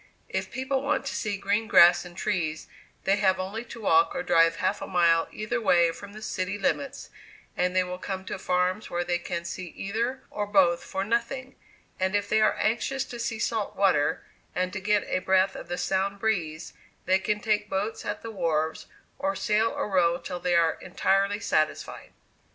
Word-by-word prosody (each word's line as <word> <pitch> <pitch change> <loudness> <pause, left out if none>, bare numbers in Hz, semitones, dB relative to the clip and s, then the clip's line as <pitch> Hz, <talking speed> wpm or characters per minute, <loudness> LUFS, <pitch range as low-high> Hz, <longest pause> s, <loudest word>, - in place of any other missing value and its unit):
If - - -3
people 265 +1 -1
want 275 0 0
to 275 - -3
see 205 -3 -2
green 205 +3 0
grass 175 -2 +7
and 175 0 -12
trees, 170 -7 -2 0.4
they 195 +1 +2
have 190 -2 +2
only 200 +5 -4
to 235 -1 -10
walk 380 - +3
or 265 - -2
drive 165 -6 +4
half - - -1
a - - -5
mile 170 -2 +3
either 235 +3 -3
way 170 -5 +4
from 200 +4 -11
the 215 +1 -9
city 185 +1 -2
limits, 275 +7 -2 0.4
and 180 0 0
they 185 - +4
will 180 0 -6
come 190 0 -5
to - - -5
farms 180 +3 0
where 175 0 -1
they 175 0 -1
can 170 -1 -4
see 180 +1 -5
either 235 +6 -2
or 205 -1 -3
both 185 -4 +3
for 190 0 -3
nothing; 235 +5 -2 0.4
and, 190 +1 +1
if 205 0 0
they 215 - +2
are 215 - +4
anxious 255 +4 0
to 240 - -8
see 230 -1 -2
salt 220 -2 -2
water, 185 -7 +2 0.3
and 185 0 -1
to 200 - -3
get 205 +1 +2
a - - 0
breath 190 +1 +2
of - - -8
the 175 +1 -3
Sound 195 +2 0
breeze, 170 -7 -2 0.3
they 190 +1 +3
can 210 +2 -1
take 210 -1 0
boats 205 +4 -2
at - - -4
the 225 - -5
wharves, 160 -5 -1 0.4
and 290 0 0
sail 220 -1 +2
or - - -3
row 175 -4 +3
till 180 0 -6
they 175 0 +1
are 165 -1 +3
entirely 195 +2 +1
satisfied." 155 -8 -1
195 Hz, 195 wpm, -27 LUFS, 180-215 Hz, 0.4 s, grass